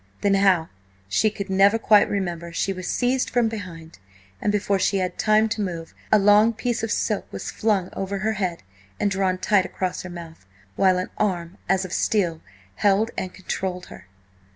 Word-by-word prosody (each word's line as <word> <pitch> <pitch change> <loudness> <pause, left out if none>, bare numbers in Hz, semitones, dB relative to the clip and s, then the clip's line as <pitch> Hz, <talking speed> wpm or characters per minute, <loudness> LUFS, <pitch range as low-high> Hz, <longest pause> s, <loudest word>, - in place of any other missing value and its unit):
Then, 200 - +2
how 190 -4 +3 0.4
she 100 - +2
could 200 -2 -6
never 195 +3 +4
quite 215 -2 +4
remember, 175 -4 -3
she 195 +3 -1
was 185 -1 -7
seized 255 +1 0
from 240 -2 +2
behind, 170 - -8 0.4
and 205 - +1
before 200 -1 0
she 195 - +1
had 185 -1 -2
time 215 +1 +4
to 215 0 -2
move, 170 -4 -5 0.2
a 215 - +7
long 210 +3 +5
piece 240 +1 -2
of 225 - -2
silk 210 -3 -1
was - - -5
flung 205 -4 0
over 195 +1 -3
her 215 +3 -1
head 185 - -3 0.4
and 205 - +1
drawn 190 -1 0
tight 190 +1 +2
across 185 -1 -3
her 185 - -8
mouth, 170 - -10 0.3
while 185 -2 +3
an 185 - -3
arm, 180 -4 -1
as 190 0 +2
of 180 - -7
steel, 175 -7 0 0.4
held 205 - +2
and 185 -1 -4
controlled 185 -1 -4
her. 95 - -14
195 Hz, 185 wpm, -23 LUFS, 180-210 Hz, 0.4 s, a